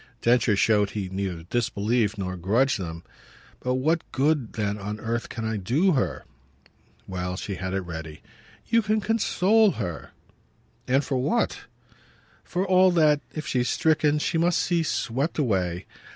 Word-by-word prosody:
Densher 120 -3 +3
showed 105 0 +3
he 95 -2 -4
neither 95 -3 -4
disbelieved 110 +1 0
nor 95 -2 -3
grudged 110 +9 +1
them. 85 -2 -6 0.6
"But 125 0 -1
what 160 +6 0
good 140 -3 +1
then 105 -1 -2
on 105 +2 -5
earth 115 +1 -3
can 115 -1 -5
I 110 0 -1
do 135 - +2
her?" 95 - -1 0.8
Well, 90 -1 -3
she 100 - -4
had 95 0 -4
it 95 - 0
ready. 80 -3 -8 0.4
"You 230 - +3
can 215 0 +1
console 220 -1 +3
her." 85 -4 -5 0.8
"And 135 +3 +2
for 135 -2 -1
what?" 155 - 0 0.8
"For 185 +2 -2
all 185 0 +5
that, 150 -3 +4
if 155 - -4
she's 125 -1 0
stricken, 155 -1 +2
she 165 +2 0
must 175 +1 +2
see 175 -1 +1
swept 140 -1 -1
away. 95 - 0
120 Hz, 150 wpm, -25 LUFS, 95-155 Hz, 0.8 s, all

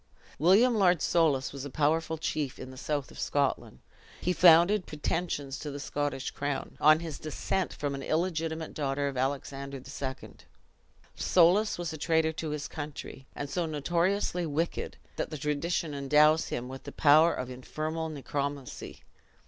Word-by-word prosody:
William 200 - +5
Lord 185 -4 +4
Soulis 145 -6 +2
was 140 -1 -6
a 145 - -5
powerful 160 +3 +1
chief 150 -3 -2
in 130 - -8
the - - -11
south 145 0 -3
of - - -12
Scotland. 140 - -1 0.4
He 180 - 0
founded 175 +3 +6
pretensions 150 -2 -3
to 150 - -5
the 145 0 -6
Scottish 145 -1 -3
crown, 145 0 -3
on 155 +2 +6
his 160 -4 -6
descent 165 +4 -2
from 145 -1 -3
an 135 - -5
illegitimate 160 0 -2
daughter 140 -1 -1
of 140 - -4
Alexander 135 +1 -3
II. 130 0 -6 0.8
Soulis 185 +5 +4
was 170 -2 -4
a 155 - -7
traitor 160 +1 +2
to 160 0 -4
his 150 -1 -3
country, 145 -3 -7
and 145 - -4
so 165 +4 -2
notoriously 170 +4 0
wicked, 160 +3 -2 0.2
that - - -2
tradition 150 +2 -1
endows 150 +3 +4
him 120 - -4
with 130 0 -9
the - - -6
power 155 +3 +5
of 130 0 -4
infernal 155 +5 -4
necromancy. 140 -2 -5
150 Hz, 155 wpm, -29 LUFS, 140-165 Hz, 0.8 s, founded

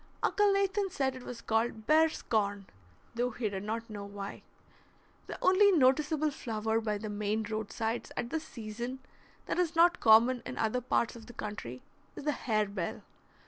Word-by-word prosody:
Uncle 415 -1 +3
Nathan 395 0 +1
said 265 -6 -1
it 255 - -8
was 245 -1 -8
called 225 0 0
"bear's 315 +4 +3
corn," 205 -3 0 0.5
though 240 +1 0
he 230 -2 -2
did 195 -1 -4
not 225 +2 -3
know 205 -2 -7
why. 200 0 -7 0.9
The - - -6
only 400 +2 +6
noticeable 300 0 +3
flower 220 -3 -1
by 210 -2 -1
the 215 +1 -6
Maine 210 +1 -1
roadsides 220 +1 -3
at 235 - -3
this 320 -1 -2
season 235 +2 -6 0.5
that - - -2
is 345 -2 +1
not 345 +2 +5
common 235 +3 +6
in - - -7
other 225 +3 0
parts 235 -1 0
of 230 -1 -12
the 245 - -11
country 165 - -6 0.3
is - - -7
the 300 - +1
harebell. 210 -9 -2
230 Hz, 170 wpm, -31 LUFS, 215-295 Hz, 0.9 s, only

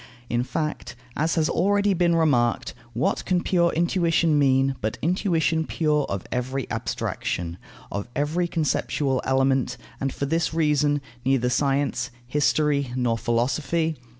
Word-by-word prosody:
In 120 0 +2
fact, 150 +2 -4 0.2
as 160 +3 0
has 160 -2 +2
already 200 +4 +2
been 175 -1 +2
remarked, 130 -8 +2 0.2
what 120 +3 0
can 180 -1 0
pure 170 -2 +2
intuition 170 -2 +2
mean, 135 -1 +3
but 110 +1 -2
intuition 165 -2 +1
pure 150 -3 +1
of 100 -2 -3
every 130 +1 -2
abstraction, 85 0 -3 0.3
of 100 0 -3
every 155 +5 0
conceptual 145 -4 0
element, 135 0 +1 0.2
and, 135 0 -1
for 140 - -3
this 160 +2 0
reason, 150 -2 +2 0.2
neither 125 -1 +2
science, 135 -2 0 0.2
history, 145 0 +1
nor 125 -2 +1
philosophy? 140 +8 0
145 Hz, 130 wpm, -24 LUFS, 130-165 Hz, 0.3 s, mean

